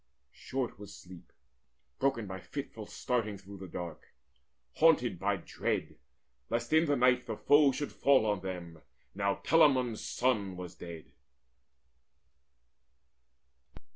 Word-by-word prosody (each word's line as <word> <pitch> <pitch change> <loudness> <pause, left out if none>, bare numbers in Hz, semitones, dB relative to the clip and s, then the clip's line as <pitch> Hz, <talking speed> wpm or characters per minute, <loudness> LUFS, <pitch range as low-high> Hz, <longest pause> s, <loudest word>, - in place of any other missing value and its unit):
Short 130 -5 -4
was 105 - -10
sleep, 90 -1 -13 0.7
Broken 135 -5 +1
by 95 -1 -6
fitful 110 +1 -7
staring 115 -5 -2
through 100 +1 -11
the 95 - -7
dark, 85 -1 -7 0.7
Haunted 125 - +4
by 100 +2 +1
dread - - -3 0.5
lest 120 +3 -1
in 160 +1 +5
the 145 - +3
night 125 -1 +3
the 110 -2 -4
foe 145 0 +5
Should 145 +2 -4
fall 135 -5 +4
on 105 -2 +1
them, 85 -4 -6 0.3
now 100 0 0
Telamon's 130 -8 +4
son 105 -7 0
was 90 -1 -7
dead. 85 -2 -10
110 Hz, 120 wpm, -31 LUFS, 95-130 Hz, 0.7 s, in